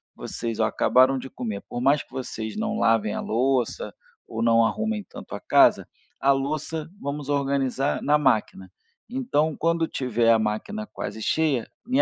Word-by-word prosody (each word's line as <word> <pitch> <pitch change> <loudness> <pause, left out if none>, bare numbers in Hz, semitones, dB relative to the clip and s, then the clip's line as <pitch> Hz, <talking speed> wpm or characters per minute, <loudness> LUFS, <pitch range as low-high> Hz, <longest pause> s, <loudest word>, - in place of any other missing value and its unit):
Vocês, 115 -2 -5
olha, - - +3
acabaram 130 +1 +4
de 135 - -8
comer, 110 -6 -5
por 120 - -4
mais 140 +4 +3
que - - -18
vocês 120 - -5
não 215 0 -1
lavem 115 - +2
a - - -3
louça 125 +1 0 0.3
ou 115 0 -4
não 115 0 +4
arrumem 220 - -1
tanto - - -9
a - - -6
casa, - - +4 0.3
a 140 - +4
louça 155 +3 -2
vamos 140 0 -5
organizar 140 -1 0
na 150 +1 +3
máquina. 110 -9 0 0.4
Então, 235 - 0
quando 165 -1 +1
tiver 120 -3 +1
a 115 - +5
máquina 110 - -3
quase 110 - -6
cheia, 150 -6 +1 0.2
me 255 +2 +3
135 Hz, 165 wpm, -25 LUFS, 115-155 Hz, 0.4 s, a